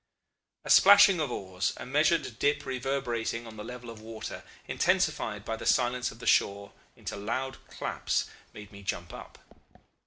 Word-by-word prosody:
"A - - -1
splashing 200 -2 +8
of 150 -5 -1
oars, 95 -3 -2
a 120 - -7
measured 150 -2 +1
dip 145 0 +1
reverberating 125 -3 -2
on 110 -1 -10
the 105 - -7
level 125 0 -8
of 110 -1 -12
water, 110 0 -7 0.3
intensified 155 - 0
by 110 - -2
the - - -9
silence 125 0 +2
of - - -11
the 120 - -10
shore 100 0 +2 0.2
into - - -6
loud 125 +6 -3
claps, - - -2 0.3
made 105 -1 -11
me 100 -1 -12
jump 85 -3 -4
up. - - -10
120 Hz, 160 wpm, -29 LUFS, 105-140 Hz, 0.3 s, splashing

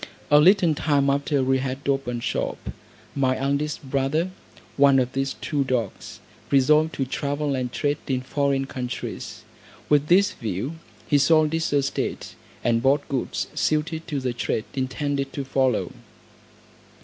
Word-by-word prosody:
A 145 - +8
little 175 0 +5
time 140 -2 +2
after 140 0 +1
we 130 0 +2
had 135 +1 -4
opened 130 -4 -1
shop, - - -3 0.4
my 130 -2 +1
eldest 140 +1 -2
brother, 140 +7 0 0.4
one 140 0 +5
of 125 -1 +1
these 135 0 -1
two 145 -2 0
dogs, 125 -6 -3 0.3
resolved 150 +4 +4
to 135 - -1
travel 145 +2 -2
and 125 -2 -2
trade 145 +2 -1
in 130 -2 0
foreign 135 0 0
countries. 125 -2 -6 0.5
With 150 0 +3
this 190 +4 +5
view, 115 - -4 0.3
he 145 - +3
sold 155 +2 +4
his 165 0 0
estate, 140 -1 -1 0.3
and 115 -1 +2
bought 140 +3 +2
goods 135 -3 -2
suited 160 +1 -1
to 145 -3 -2
the 130 -2 -2
trade 115 -2 -2
intended 140 +1 -2
to 140 - -4
follow. 130 -3 +1
140 Hz, 145 wpm, -24 LUFS, 130-150 Hz, 0.5 s, A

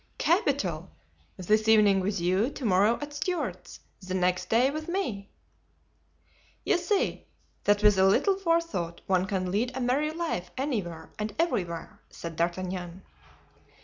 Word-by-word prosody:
"Capital! - - 0 0.5
This 215 +4 +1
evening 210 -3 +5
with 195 +1 -1
you, 185 +7 +1
to 280 -3 -7
morrow 210 +3 +3
at 290 0 -7
Stuart's, 355 +5 -4 0.2
the 185 0 -4
next 180 0 0
day 245 +4 +3
with 310 +1 -5
me." 250 - -3 1.4
"You 350 - +3
see, 385 +3 -1 0.4
that 205 0 +3
with 210 -2 +5
a 190 - +6
little 380 - +3
forethought 335 - -1
one 185 0 +1
can 185 -2 -2
lead 245 +6 -1
a - - -2
merry 260 +5 +1
life 315 - -3
anywhere 200 - -3
and 210 0 -3
everywhere," 180 - -2
said 165 -1 -8
D'Artagnan. 180 +1 -3
205 Hz, 140 wpm, -28 LUFS, 185-285 Hz, 1.4 s, a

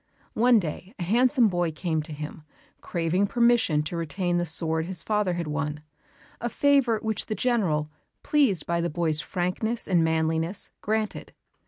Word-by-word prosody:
One 240 +1 +5
day 185 - -4
a 180 - -4
handsome 240 - +3
boy 175 -4 0
came 160 0 -2
to 155 +1 -8
him, 150 +1 -7 0.4
craving 175 +4 0
permission 235 -10 +3
to 155 - -5
retain 175 +2 -1
the 175 - -1
sword 160 0 -1
his 185 -2 -2
father 210 -4 0
had 170 -1 -3
won, 150 0 -3 0.6
a 240 - -1
favour 275 -3 +3
which 220 -1 -1
the 215 - -2
General, 180 -13 0 0.3
pleased 260 - +2
by 170 0 0
the 170 - -1
boy's 155 -1 0
frankness 185 +8 -2
and 175 -4 +3
manliness, 160 +3 0
granted. 215 0 -2
175 Hz, 160 wpm, -26 LUFS, 160-220 Hz, 0.6 s, One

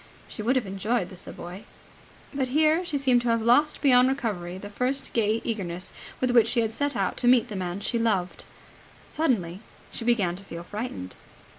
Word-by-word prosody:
She - - -7
would 240 +5 +1
have 255 -4 +1
enjoyed 195 +1 -1
the - - -9
Savoy. 180 +1 -9 0.7
But 270 -2 0
here 310 +5 +3
she 320 -5 -2
seemed 255 -3 +3
to 240 - -3
have 230 0 +3
lost 285 +6 +3
beyond 255 -2 +6
recovery 200 -10 -3
the 205 +2 -9
first 255 +5 -1
gay 225 0 +1
eagerness 185 -5 -4 0.3
with 255 -1 +1
which 235 -2 +5
she 235 0 +2
had 225 -1 -1
set 285 +2 -1
out 195 -3 -1
to 245 - 0
meet 245 -1 +5
the 210 - -5
man 185 +1 -3
she 235 +3 -1
loved. 190 -6 -1 0.7
Suddenly 195 - 0 0.3
she - - -2
began 210 -7 +2
to 195 - -9
feel 170 -3 -8
frightened. 205 - -6
230 Hz, 190 wpm, -26 LUFS, 190-255 Hz, 0.7 s, beyond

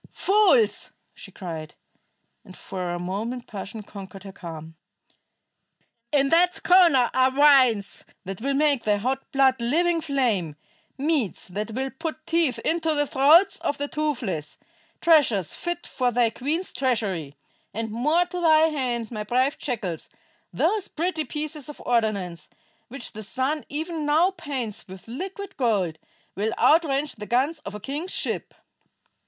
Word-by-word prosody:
Fools!" 425 +3 +3 0.2
she - - -12
cried, 160 -5 -7 0.7
and 185 - -14
for 180 -2 -5
a 175 - -2
moment 215 +8 -4
passion 210 +1 -7
conquered 195 -2 -10
her 195 - -8
calm. 165 -3 -9 1.4
"In 275 -2 +3
that 355 +3 +4
schooner 335 -9 +5
are 260 0 +4
wines 260 -7 +4 0.2
that 195 +2 -6
will 275 +2 0
make 285 -3 +3
thy 210 -1 +2
hot 260 +6 -3
blood 265 -2 +3
living 330 +7 +2
flame; 240 - 0 0.4
meats 280 - -1
that 210 +4 -4
will 265 +1 -2
put 315 +2 -6
teeth 330 -6 +1
into 325 -1 +1
the 290 0 +2
throats 305 +9 +5
of 285 - -2
the 285 - -2
toothless; 240 - -3 0.4
treasures 275 - +4
fit 345 0 -3
for 250 -2 0
thy 235 -1 +2
queen's 310 +10 -3
treasury. 200 - -1 0.4
And 225 +1 -4
more 300 +10 +2
to 355 0 -5
thy 320 -1 +5
hand, 245 -6 -2
my 215 -2 -4
brave 255 +6 +1
jackals, 205 - -4 0.4
those 425 -3 0
pretty 325 -1 -2
pieces 300 +1 -5
of 295 - -9
ordnance, 210 -8 -1 0.4
which 255 0 -8
the 215 - -8
sun 260 +8 -2
even 315 +1 -3
now 325 +6 +4
paints 280 - -5
with 190 +2 -12
liquid 385 - -6
gold, 195 - 0 0.4
will 210 +3 -1
outrange 295 -4 +3
the 210 0 -7
guns 275 +7 +1
of 205 -8 -8
a - - -6
king's 290 - -4
ship." - - -3
265 Hz, 145 wpm, -25 LUFS, 210-310 Hz, 1.4 s, schooner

